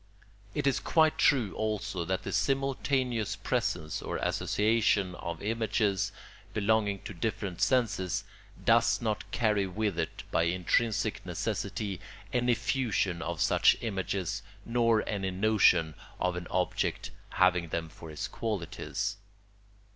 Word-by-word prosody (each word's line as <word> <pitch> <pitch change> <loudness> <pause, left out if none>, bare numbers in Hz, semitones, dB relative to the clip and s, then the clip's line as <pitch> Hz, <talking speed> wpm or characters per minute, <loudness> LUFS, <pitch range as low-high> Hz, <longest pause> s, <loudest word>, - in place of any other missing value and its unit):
It - - -1
is 140 - +3
quite 160 -2 +3
true 120 -8 +3
also 105 -4 -2
that 95 +2 -1
the - - -4
simultaneous 130 -5 0
presence 80 -1 -1
or - - -3
association 105 -3 +1
of 85 -1 -6
images 105 -3 0 0.4
belonging 105 -2 +1
to - - -6
different 95 -1 -3
senses 100 -5 +1 0.4
does 115 +1 +4
not 110 -3 -2
carry 105 -4 +1
with 100 -1 -1
it 80 - -3
by 85 - +3
intrinsic 90 +6 +1
necessity 100 -2 -3 0.3
any 125 -1 +3
fusion 115 -8 0
of 85 -1 -3
such - - +5
images 95 -4 -2 0.2
nor 115 -2 +2
any 95 -2 -1
notion 95 -5 +3 0.3
of 90 -1 0
an 90 0 -5
object - - -1 0.2
having 90 -2 +3
them 80 +1 -2
for 80 0 -11
its 75 - -4
qualities. 100 -4 -3
105 Hz, 125 wpm, -30 LUFS, 90-115 Hz, 0.4 s, such